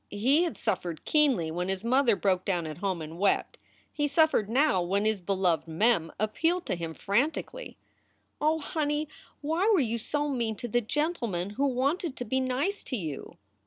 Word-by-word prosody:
He 255 +10 +3
had 340 - -4
suffered 180 -6 -3
keenly 265 - +2
when 180 +3 -2
his 190 +1 -2
mother 245 -1 +3
broke 185 -2 +1
down 175 -4 -1
at 155 -1 -6
home 190 -5 -2
and 160 +2 -9
wept. 200 0 +1 0.3
He 295 -1 0
suffered 290 -8 +3
now 260 -5 +3
when 195 +4 0
his 215 -3 +1
beloved 180 -3 0
Mem 165 0 +2
appealed 325 - 0
to - - -1
him 165 -2 -5
frantically: 285 - -1 0.6
"Oh, 310 +2 +3
honey, 300 -1 -1 0.3
why 325 +8 +1
were 400 - +5
you 235 -4 0
so 295 +6 -1
mean 235 -6 -1
to 240 - -6
the 240 +2 +1
gentleman 230 - -2
who 275 +7 0
wanted 275 +4 0
to 245 - -4
be 260 +4 0
nice 265 +10 -1
to 255 - -3
you?" 155 -8 -6
235 Hz, 180 wpm, -28 LUFS, 190-295 Hz, 0.6 s, were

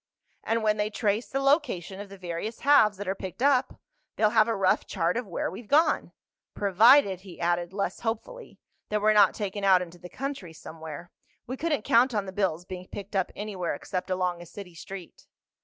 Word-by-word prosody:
"And 225 0 0
when 215 0 +2
they 210 0 0
trace 215 +1 -1
the 270 - -1
location 270 - +1
of 205 -1 -8
the 195 - -11
various 180 +5 -5
halves 220 -8 +5
that 205 0 -6
are 190 - +1
picked 190 +5 -6
up, 270 -2 +2 0.4
they'll 215 -1 +3
have 220 -1 +4
a 230 - 0
rough 190 -1 +2
chart 175 -2 0
of 245 -2 -3
where 175 - -3
we've 205 +5 -9
gone. 305 +6 +3 0.4
Provided," 200 +1 +5
he 190 -3 -12
added, 175 0 0
less 200 +1 -3
hopefully, 235 - -5 0.3
"that 210 - 0
we're 215 +1 +4
not 205 -2 +5
taken 205 -1 -4
out 190 -2 +6
into 175 0 -12
the 180 - -10
country 270 -11 -5
somewhere. 160 +1 -9 0.3
We 255 - -4
couldn't 295 -5 -1
count 240 +2 +4
on 205 -2 0
the 190 - -6
bills 180 -4 -1
being 185 0 -8
picked 200 0 -8
up 190 -1 0
anywhere 195 -6 -3
except 185 +5 -5
along 180 -2 -1
a 175 - -11
city 185 0 -10
street." 180 +1 -10
200 Hz, 200 wpm, -27 LUFS, 180-225 Hz, 0.4 s, out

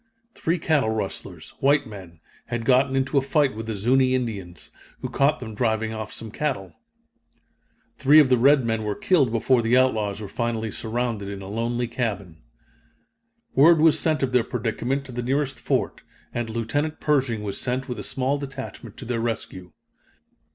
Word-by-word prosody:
Three 165 +2 -1
cattle 155 -7 +1
rustlers, 95 -6 -5
white 140 +2 +3
men, 95 -7 -11 0.3
had 120 -1 -3
gotten 130 +1 +3
into 135 +1 +2
a - - -1
fight 140 -2 +1
with 110 0 -6
the 110 - -3
Zuni 130 +5 +3
Indians, 100 -9 -4 0.3
who - - -4
caught 140 +2 +2
them 110 -3 -7
driving 110 0 0
off 110 -1 -5
some 110 -2 -7
cattle. 115 - -3 1.3
Three 145 +3 +6
of 150 - +6
the 130 -1 +4
red 135 +1 +5
men 115 -1 -1
were 105 -1 -2
killed 145 -11 +2
before 120 +2 +2
the 115 +2 +3
outlaws 110 -6 +1
were 105 - -6
finally 115 +1 -2
surrounded 110 -2 -3
in 100 -1 -6
a - - -8
lonely 120 +3 -2
cabin. 100 -9 -4 1.1
Word 160 +4 +6
was 160 0 +5
sent 155 -3 +1
of 130 - 0
their 125 -2 +3
predicament 125 +4 -2
to 130 - -9
the 125 0 -3
nearest 135 +2 -1
fort, - - -1 0.3
and 120 -1 -3
Lieutenant 130 +8 -2
Pershing 130 -7 +1
was 100 -2 -4
sent 130 +1 -2
with 125 -4 -5
a - - -5
small 135 +2 -1
detachment 135 -1 -8
to 130 - -8
their 115 -1 -2
rescue. 95 -6 -4
120 Hz, 175 wpm, -24 LUFS, 110-135 Hz, 1.3 s, Three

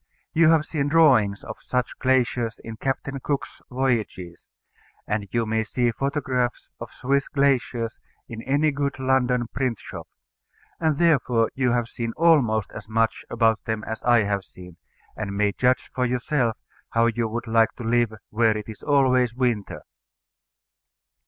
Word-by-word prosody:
You 165 0 +5
have 160 -2 +4
seen 145 -4 -1
drawings 130 -11 +4
of 110 - -8
such 125 -1 -2
glaciers 125 -3 +1
in 115 0 -7
Captain 135 +2 -3
Cook's 140 +1 -4
Voyages; 115 -9 -2 0.6
and 105 -1 -2
you 115 -1 0
may 110 0 0
see 120 +2 0
photographs 130 -1 -2
of - - -8
Swiss 140 +2 0
glaciers 125 -4 0 0.3
in 115 -1 -7
any 145 +5 +1
good 140 -1 -2
London 130 -2 +1
print 130 -4 -1
shop; - - -9 0.7
and 160 -3 +1
therefore 130 -9 +2
you 125 -2 +1
have 120 -2 0
seen 115 -1 -4
almost 140 -11 +3
as 110 0 -10
much 115 0 0
about 115 -1 +2
them 110 -1 -2
as 110 0 -5
I 120 -2 +4
have 100 -1 -1
seen, 90 -2 -14 0.4
and 100 -2 -4
may 105 0 +2
judge 125 +5 0
for 125 - -1
yourself 125 -1 0 0.3
how 115 0 +2
you 115 0 0
would 115 +2 -4
like 115 -1 +3
to 120 - -8
live 120 0 +2 0.2
where 110 0 +2
it 105 - -7
is 110 -2 -9
always 130 -4 +2
winter. 120 -6 -1
120 Hz, 155 wpm, -24 LUFS, 110-135 Hz, 0.7 s, You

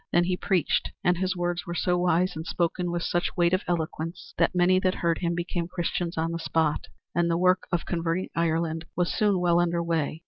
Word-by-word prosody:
Then 175 - +4
he 180 +1 0
preached, 180 -2 +1
and 180 0 +2
his 185 0 0
words 175 +1 -2
were 170 - -4
so 180 0 +1
wise 175 0 +2
and 160 - -4
spoken 175 +1 -1
with 170 -1 -2
such 175 +2 -1
weight 175 0 +3
of 185 - +3
eloquence 165 0 -3
that - - +2
many 180 +1 +4
that 185 0 +1
heard 170 -1 0
him 170 -1 -1
became 175 0 -2
Christians 175 -1 -2
on 165 +1 0
the 170 - -3
spot, 160 -2 0 0.3
and 170 +1 +2
the 165 - +2
work 185 +1 +3
of 175 -2 0
converting 170 +1 -1
Ireland 165 0 0
was 175 0 0
soon 205 -3 +2
well 175 -1 +3
under 170 -1 +1
way. 160 -2 -1
175 Hz, 215 wpm, -27 LUFS, 165-180 Hz, 0.3 s, Then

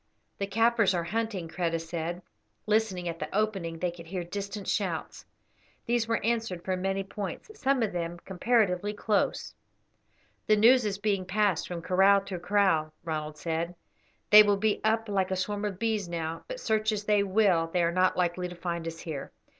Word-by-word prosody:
"The 200 - -1
Kaffirs 225 -1 +3
are 170 - 0
hunting," 200 -1 -2
Kreta 165 -1 -1
said. 170 +2 -4 0.4
Listening 210 -5 +1
at 165 -1 -4
the - - -4
opening 195 -6 -1
they 180 +1 -1
could 170 -1 -12
hear 180 0 -3
distant 200 +3 -6
shouts. - - -2 0.6
These 235 -1 +1
were 230 - +1
answered 225 -7 -1
from 185 -1 -1
many 195 +1 -1
points, 195 - -6
some 270 -3 +2
of 215 - 0
them 170 -1 -3
comparatively 205 -1 +1
close. 205 - 0 0.9
"The 215 - +5
news 235 +3 +6
is 200 -2 -1
being 200 -2 0
passed 200 -2 +1
from 170 -2 -5
kraal 195 +3 +5
to 195 -2 -6
kraal," 180 -4 +2
Ronald 155 -2 -4
said; 165 +2 -3 0.6
"they 210 0 +11
will 205 -1 +3
be 215 +1 0
up 225 +1 +1
like 195 -2 0
a 190 - 0
swarm 205 +2 -2
of 200 -3 -3
bees 215 -4 -1
now, 165 -1 -4
but - - -6
search 220 - +1
as 210 -1 -2
they 210 -1 +3
will 190 -4 +3
they 175 +1 0
are 170 - +2
not 185 +1 +2
likely 180 0 0
to 180 - -9
find 170 -1 -4
us 165 0 -6
here. 155 -5 -6
190 Hz, 185 wpm, -28 LUFS, 170-215 Hz, 0.9 s, they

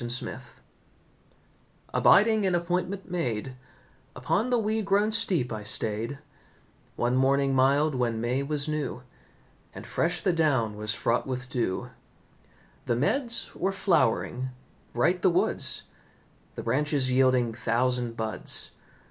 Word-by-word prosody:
THE - - -3
CUCKOO 125 +1 -2 1.5
Abiding 215 +1 +5
an 180 - +1
appointment 180 +2 -2
made, 130 -7 -3 0.6
Upon 195 - 0
the 245 - +2
weed 220 0 0
grown 200 +2 +2
steep 185 - +1
I 110 - -5
stayed, 110 +4 -1 0.8
One 120 +1 0
morning 135 +1 +2
mild 140 +3 +3
when 120 -3 -1
May 120 +4 -1
was 140 +1 -1
new, 150 -5 -3 0.7
And - - -8
fresh 175 +1 -1
the 185 - +1
down 130 -10 +1
was 105 +2 -1
fraught 120 +3 0
with 125 -1 -4
dew. 115 -7 -2 1.0
The 120 - +1
meads 235 - -1
were 190 - -1
flowering, 130 - 0 0.4
bright 170 +9 +1
the 190 - +4
woods, 175 - +1 0.7
The - - -6
branches 145 -2 +1
yielding 130 -2 +3
thousand 120 0 -1
buds. 110 -4 0
135 Hz, 125 wpm, -27 LUFS, 120-180 Hz, 1.5 s, Abiding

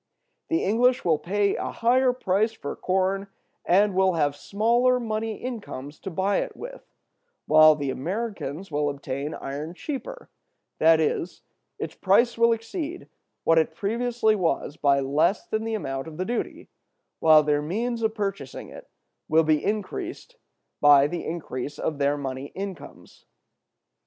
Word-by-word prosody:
The 330 - 0
English 245 +5 +2
will 160 -3 +3
pay 200 +4 0
a - - -3
higher 250 +2 +3
price 220 -2 0
for 145 -10 -6
corn, 190 +1 0 0.4
and 200 +3 +3
will 190 0 +3
have 145 -3 +1
smaller 240 +8 +2
money 220 -1 -2
incomes 195 - -7
to 195 - -6
buy 190 +3 0
it - - -3
with; - - -8 0.6
while 155 0 +7
the 140 -2 -2
Americans 190 - -4
will 145 0 0
obtain 140 +1 -4
iron 150 +5 -6
cheaper, 320 - -6 0.5
that 160 0 +6
is, 160 +2 -2 0.3
its - - -5
price 220 +5 +3
will 230 0 +4
exceed 305 - -4 0.3
what 165 0 +5
it 160 - -1
previously 230 +1 +1
was 165 -6 -1
by 140 -3 +3
less 150 +8 +1
than 220 0 -2
the 225 0 -1
amount 135 -7 -4
of 155 -1 -9
the 185 - -2
duty, 240 +3 -4 0.5
while 155 -1 +6
their 150 0 +1
means 230 +9 -2
of 220 0 0
purchasing 195 - -4
it - - -12 0.4
will 160 +1 +4
be 155 -1 +2
increased 215 - -4 0.4
by 145 -1 +7
the 170 +4 -3
increase 145 -4 -5
of 155 -3 -3
their 140 +1 +2
money 135 -1 -5
incomes. 190 -7 -8
190 Hz, 150 wpm, -25 LUFS, 150-225 Hz, 0.6 s, while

